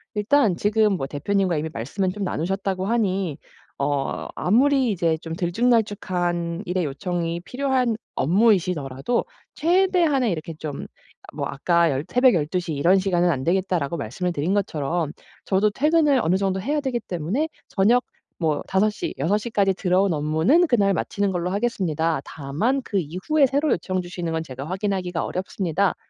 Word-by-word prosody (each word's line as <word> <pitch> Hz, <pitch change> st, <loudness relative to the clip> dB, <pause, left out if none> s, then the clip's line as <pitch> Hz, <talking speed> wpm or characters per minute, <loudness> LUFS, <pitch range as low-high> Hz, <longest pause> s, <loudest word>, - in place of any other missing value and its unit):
일단 210 Hz, -1 st, +3 dB
지금 210 Hz, +2 st, +2 dB
뭐 170 Hz, -8 st, -2 dB
대표님과 180 Hz, +5 st, 0 dB
이미 155 Hz, +2 st, -2 dB
말씀은 185 Hz, -, -2 dB
좀 205 Hz, +2 st, -5 dB
나누셨다고 190 Hz, +2 st, -2 dB
하니 195 Hz, -8 st, 0 dB, 0.4 s
어 140 Hz, -1 st, -1 dB
아무리 260 Hz, +5 st, +3 dB
이제 170 Hz, -4 st, +1 dB
좀 165 Hz, 0 st, -5 dB
들쭉날쭉한 180 Hz, -3 st, 0 dB
일의 180 Hz, -1 st, -1 dB
요청이 170 Hz, +3 st, -3 dB
필요한 255 Hz, 0 st, 0 dB, 0.2 s
업무이시더라도 180 Hz, -, +1 dB, 0.3 s
최대한의 335 Hz, -, +2 dB
이렇게 165 Hz, -1 st, -4 dB
좀 155 Hz, -2 st, -6 dB, 0.5 s
뭐 -, -, -3 dB
아까 170 Hz, +4 st, +2 dB
열 135 Hz, +2 st, -2 dB
"새벽 250 Hz, +4 st, +4 dB
12 165 Hz, +3 st, 0 dB
시 175 Hz, -2 st, -5 dB
이런 175 Hz, +7 st, +4 dB
시간은 180 Hz, -2 st, +2 dB
안 130 Hz, -4 st, -2 dB
되겠다."라고 170 Hz, -3 st, 0 dB
말씀을 150 Hz, +8 st, -3 dB
드린 170 Hz, +3 st, -1 dB
것처럼 165 Hz, -5 st, -1 dB, 0.3 s
"저도 205 Hz, +2 st, +2 dB
퇴근을 300 Hz, +2 st, +3 dB
어느 175 Hz, 0 st, +2 dB
정도 190 Hz, -1 st, -1 dB
해야 290 Hz, +8 st, 0 dB
되기 260 Hz, -4 st, -1 dB
때문에 210 Hz, -, -2 dB, 0.2 s
저녁 230 Hz, +6 st, +3 dB, 0.3 s
뭐 155 Hz, -4 st, 0 dB
5 195 Hz, +3 st, +2 dB
시, -, -, -5 dB
6 170 Hz, +10 st, +1 dB
시까지 205 Hz, -3 st, +1 dB
들어온 185 Hz, 0 st, +1 dB
업무는 160 Hz, -, +3 dB
그날 205 Hz, -7 st, +3 dB
마치는 200 Hz, +3 st, -1 dB
걸로 180 Hz, -1 st, -2 dB
하겠습니다. 170 Hz, -, 0 dB
다만 160 Hz, -, -2 dB
그 200 Hz, -, -1 dB
이후에 190 Hz, -, +1 dB
새로 285 Hz, +3 st, +1 dB
요청 185 Hz, +2 st, -1 dB
주시는 175 Hz, -2 st, -4 dB
건 160 Hz, 0 st, -1 dB
제가 135 Hz, -3 st, -7 dB
확인하기가 185 Hz, -2 st, -2 dB
어렵습니다." 185 Hz, 0 st, -1 dB
185 Hz, 345 characters per minute, -23 LUFS, 165-215 Hz, 0.5 s, 새벽